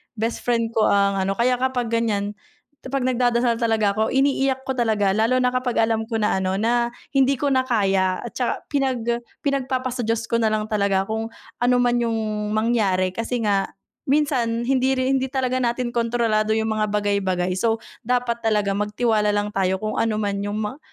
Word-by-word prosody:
bestfriend 230 Hz, +1 st, -1 dB
ko 220 Hz, -1 st, +2 dB
ang 200 Hz, -1 st, +2 dB
ano, 195 Hz, +1 st, 0 dB
kaya 250 Hz, +1 st, +1 dB
kapag 250 Hz, -3 st, -1 dB
ganiyan, 210 Hz, -3 st, 0 dB, 0.5 s
‘pag 265 Hz, 0 st, -3 dB
nag-dadasal 245 Hz, -2 st, +1 dB
talaga 220 Hz, -3 st, +2 dB
ako, 220 Hz, +2 st, 0 dB
iniiyak 270 Hz, -1 st, +1 dB
ko 265 Hz, -, -3 dB
talaga 220 Hz, -6 st, +1 dB
lalo 225 Hz, +5 st, +2 dB
na 250 Hz, -1 st, +2 dB
kapag 255 Hz, -2 st, 0 dB
alam 225 Hz, 0 st, 0 dB
ko 230 Hz, -, -4 dB
na 210 Hz, -3 st, +1 dB
ano, 190 Hz, 0 st, -1 dB
na 235 Hz, +3 st, +1 dB, 0.2 s
hindi 275 Hz, 0 st, +3 dB
ko 285 Hz, +1 st, -1 dB
na 260 Hz, 0 st, +1 dB
kaya 195 Hz, -5 st, +1 dB
at 240 Hz, -, -6 dB
tsaka 245 Hz, -, -2 dB
pinag 265 Hz, -5 st, 0 dB, 0.4 s
pinag-papasa 260 Hz, -2 st, -1 dB
Diyos 230 Hz, 0 st, 0 dB
ko 230 Hz, -, +2 dB
nalang 215 Hz, -1 st, +1 dB
talaga 200 Hz, -2 st, +2 dB
kung 220 Hz, +2 st, -3 dB, 0.3 s
ano 245 Hz, +1 st, +3 dB
man 245 Hz, -1 st, +2 dB
yung 230 Hz, -1 st, 0 dB, 0.4 s
mangyari 205 Hz, -5 st, +1 dB
kasi 230 Hz, +3 st, -3 dB
nga, 200 Hz, -2 st, +1 dB, 0.4 s
minsan 255 Hz, -5 st, +1 dB
hindi 265 Hz, +1 st, +2 dB
rin 260 Hz, +1 st, +1 dB
hindi 265 Hz, -, -2 dB
talaga 255 Hz, -1 st, -1 dB
natin 240 Hz, 0 st, -1 dB
kontrolado 230 Hz, -2 st, +1 dB
yung 220 Hz, 0 st, 0 dB
mga 215 Hz, 0 st, 0 dB
bagay-bagay. 200 Hz, -3 st, 0 dB
So 225 Hz, -1 st, 0 dB, 0.2 s
dapat 245 Hz, -1 st, -1 dB
talaga 210 Hz, -2 st, +1 dB
magtiwala 210 Hz, +1 st, +1 dB
lang 205 Hz, 0 st, -1 dB
tayo 190 Hz, -1 st, +1 dB
kung 215 Hz, -, -2 dB
ano 225 Hz, -1 st, +1 dB
man 205 Hz, -2 st, -1 dB
yung 205 Hz, +2 st, -2 dB
mang 255 Hz, +8 st, -5 dB
230 Hz, 180 wpm, -22 LUFS, 210-250 Hz, 0.5 s, hindi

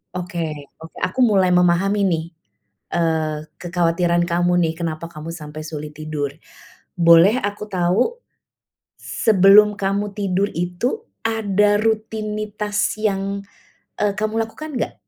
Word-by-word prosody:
Oke 165 Hz, -5 st, -4 dB
oke, 160 Hz, 0 st, -12 dB
aku 185 Hz, -, -2 dB
mulai 195 Hz, -7 st, +4 dB
memahami 180 Hz, +3 st, +3 dB
nih, 165 Hz, -2 st, 0 dB, 0.7 s
eee, 160 Hz, -2 st, 0 dB, 0.2 s
kekhawatiran 175 Hz, 0 st, +1 dB
kamu 175 Hz, +1 st, +1 dB
nih, 160 Hz, -1 st, +1 dB
kenapa 165 Hz, -1 st, -4 dB
kamu 165 Hz, 0 st, -8 dB
sampai 155 Hz, -1 st, -8 dB
sulit 150 Hz, -1 st, -7 dB
tidur. 155 Hz, -2 st, -3 dB, 0.7 s
Boleh 170 Hz, +8 st, +6 dB
aku 205 Hz, +1 st, -3 dB
tahu, 205 Hz, -, 0 dB, 0.8 s
sebelum 210 Hz, 0 st, +5 dB
kamu 200 Hz, +1 st, -1 dB
tidur 200 Hz, -1 st, 0 dB
itu 180 Hz, -, -2 dB, 0.2 s
ada 210 Hz, -2 st, +2 dB
rutinitas 215 Hz, -1 st, -2 dB
yang, 200 Hz, -1 st, -1 dB, 0.6 s
eee, 205 Hz, -1 st, +1 dB
kamu 215 Hz, +1 st, -1 dB
lakukan 300 Hz, +7 st, -8 dB
enggak? -, -, -2 dB
185 Hz, 115 wpm, -21 LUFS, 170-210 Hz, 0.8 s, Boleh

